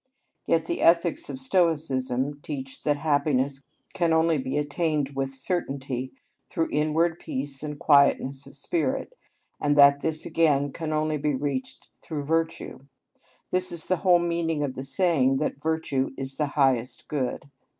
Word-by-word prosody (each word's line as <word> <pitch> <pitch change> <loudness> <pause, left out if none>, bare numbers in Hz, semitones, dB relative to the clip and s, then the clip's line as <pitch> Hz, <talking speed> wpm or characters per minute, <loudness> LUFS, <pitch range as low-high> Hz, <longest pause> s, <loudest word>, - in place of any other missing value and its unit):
Yet 165 -1 +2
the - - -3
ethics 170 -1 +3
of 135 -2 -6
Stoicism 140 -4 0
teach 135 -3 -7
that 145 -1 +1
happiness 145 -2 0 0.3
can 170 -3 +1
only 160 -1 +3
be 130 +2 -3
attained 150 -1 -1
with 135 0 -1
certainty 135 -3 -3 0.4
through 165 - -1
inward 160 +3 +1
peace 135 +1 -3
and 150 -1 -5
quietness 140 -2 +3
of 140 - -12
spirit 330 - -1
(αταραξια), - - -34 0.4
and 145 0 +2
that 140 0 +7
this 155 -1 -1
again 145 -4 +2
can 160 +1 -4
only 155 0 0
be 150 0 0
reached 135 -1 -4
through 150 -3 -6
virtue; 165 -3 -2 0.7
this 185 0 +2
is 170 -2 -2
the 185 - +1
whole 180 -1 +4
meaning 170 -3 -1
of 135 -3 -2
the 130 - -6
saying 135 -2 +2
that 145 0 -2
virtue 160 -4 -1
is 135 0 -4
the 150 - 0
highest 130 -3 +1
good. 140 -1 -3
145 Hz, 155 wpm, -26 LUFS, 135-160 Hz, 0.7 s, that